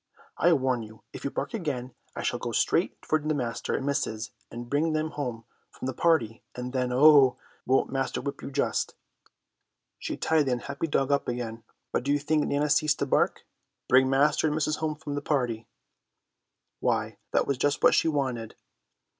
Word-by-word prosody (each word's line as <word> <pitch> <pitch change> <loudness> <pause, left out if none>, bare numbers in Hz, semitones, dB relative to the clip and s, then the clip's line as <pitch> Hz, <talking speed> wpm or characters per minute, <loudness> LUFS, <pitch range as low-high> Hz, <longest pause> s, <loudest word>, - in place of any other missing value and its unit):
"I 175 - +3
warn 130 -4 +1
you 110 0 -12
if - - -8
you 140 - -1
bark - - -4
again 135 - -3 0.2
I - - -4
shall - - -1
go - - -4
straight - - +1
for 155 - +2
master 145 -6 -2
and 135 - -2
missus 120 -6 -2 0.2
and 120 +1 -7
bring 150 +5 +1
them 155 0 -1
home 120 -6 -4 0.2
from - - -9
the 130 - -2
party, 120 -7 +1
and 125 +1 -5
then, 125 -1 0
oh, 140 -1 +6 0.3
won't 130 +1 +2
master 135 0 -1
whip 140 +2 -5
you, - - -6
just." 140 0 -1 1.0
She - - -4
tied 155 -3 +2
the 130 - +2
unhappy 140 +6 -3
dog 135 -2 +1
up 140 -1 +1
again, 115 -2 -4 0.3
but - - 0
do 140 +3 -1
you 145 - +4
think 150 +1 +1
Nana 145 +1 +1
ceased 155 -1 +3
to - - 0
bark? 135 - +1 0.4
Bring 130 +1 +5
master 145 +3 +3
and 150 - 0
missus 155 -1 0
home 155 -1 -2
from 150 -1 -6
the 145 - -2
party! 125 -7 -1 1.1
Why, - - -1
that - - +2
was 140 -2 -1
just 145 +1 +1
what - - +7
she - - +3
wanted. 130 -7 -2
140 Hz, 190 wpm, -27 LUFS, 125-150 Hz, 1.1 s, what